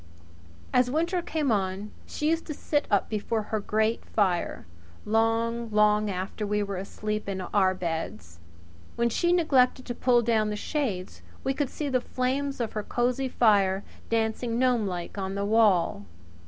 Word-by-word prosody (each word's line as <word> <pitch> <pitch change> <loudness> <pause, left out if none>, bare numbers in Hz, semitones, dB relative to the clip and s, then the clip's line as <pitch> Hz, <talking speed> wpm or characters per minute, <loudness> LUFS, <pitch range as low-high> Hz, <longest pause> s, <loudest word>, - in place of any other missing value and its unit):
As 250 0 +4
winter 335 +6 0
came 305 -6 -1
on 195 0 -1 0.2
she 300 +1 -1
used 330 0 -1
to 305 - -4
sit 290 0 -1
up 200 -2 +2
before 215 +1 -2
her 215 - +2
grate 215 +2 0
fire 185 -5 0 0.4
long, 225 +1 +1
long 210 0 +3
after 190 +3 -4
we 210 0 0
were 200 -1 -4
asleep 210 +2 -4
in 190 -1 -3
our 185 0 +2
beds. 110 - -5 0.6
When 235 0 +2
she 345 +9 +1
neglected 270 -7 +3
to 240 - -3
pull 240 0 +3
down 220 -2 +2
the 210 - -2
shades 210 -6 -3 0.2
we 270 - +1
could 280 -1 -1
see 300 - -4
the 255 -2 +1
flames 265 +3 -2
of 235 -2 -2
her 215 - -2
cosy 250 +4 0
fire 200 -5 +3 0.3
dancing 230 +1 0
gnomelike 210 -8 0
on 190 0 -3
the 200 0 -1
wall. 200 - +3
220 Hz, 160 wpm, -27 LUFS, 200-250 Hz, 0.6 s, As